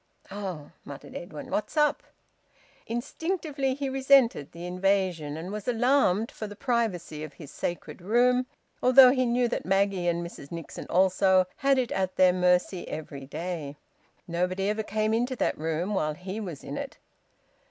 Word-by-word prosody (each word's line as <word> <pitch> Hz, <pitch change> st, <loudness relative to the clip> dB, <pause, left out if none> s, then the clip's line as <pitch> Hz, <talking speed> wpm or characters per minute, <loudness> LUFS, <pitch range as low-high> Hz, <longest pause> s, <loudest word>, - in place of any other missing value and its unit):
"Oh!" 190 Hz, -7 st, -6 dB
muttered 140 Hz, -, -10 dB
Edwin. 155 Hz, -4 st, -8 dB
"What's 215 Hz, -, -2 dB
up?" 300 Hz, -1 st, +3 dB, 0.9 s
Instinctively 285 Hz, +2 st, -2 dB
he 280 Hz, 0 st, -3 dB
resented 265 Hz, -, +3 dB
the 170 Hz, +1 st, -8 dB
invasion, 180 Hz, -4 st, 0 dB
and 175 Hz, +4 st, -6 dB
was 210 Hz, -1 st, -6 dB
alarmed 240 Hz, -4 st, +2 dB
for 215 Hz, -, -6 dB
the 205 Hz, -, -9 dB
privacy 205 Hz, -, -1 dB
of 155 Hz, -2 st, -8 dB
his 150 Hz, -2 st, -11 dB
sacred 175 Hz, +1 st, -5 dB
room, 250 Hz, +6 st, +3 dB, 0.3 s
although 255 Hz, 0 st, +8 dB
he 255 Hz, -1 st, +1 dB
knew 240 Hz, +1 st, +2 dB
that -, -, -2 dB
Maggie, 195 Hz, -1 st, +1 dB
and 170 Hz, 0 st, 0 dB
Mrs 140 Hz, -4 st, -10 dB
Nixon 165 Hz, -2 st, -7 dB
also, 185 Hz, +1 st, +4 dB
had 275 Hz, -1 st, +3 dB
it 250 Hz, -2 st, 0 dB
at 190 Hz, -1 st, -1 dB
their 185 Hz, -1 st, +5 dB
mercy 180 Hz, 0 st, +1 dB
every 140 Hz, -3 st, -7 dB
day. 155 Hz, -2 st, -5 dB, 0.5 s
Nobody 180 Hz, +3 st, -1 dB
ever 215 Hz, +1 st, 0 dB
came 215 Hz, +1 st, -1 dB
into 245 Hz, +3 st, 0 dB
that -, -, 0 dB
room 165 Hz, +5 st, -2 dB
while 155 Hz, -5 st, 0 dB
he 190 Hz, +5 st, -6 dB
was 175 Hz, -9 st, -6 dB
in -, -, -6 dB
it. -, -, -7 dB
195 Hz, 160 wpm, -27 LUFS, 175-245 Hz, 0.9 s, although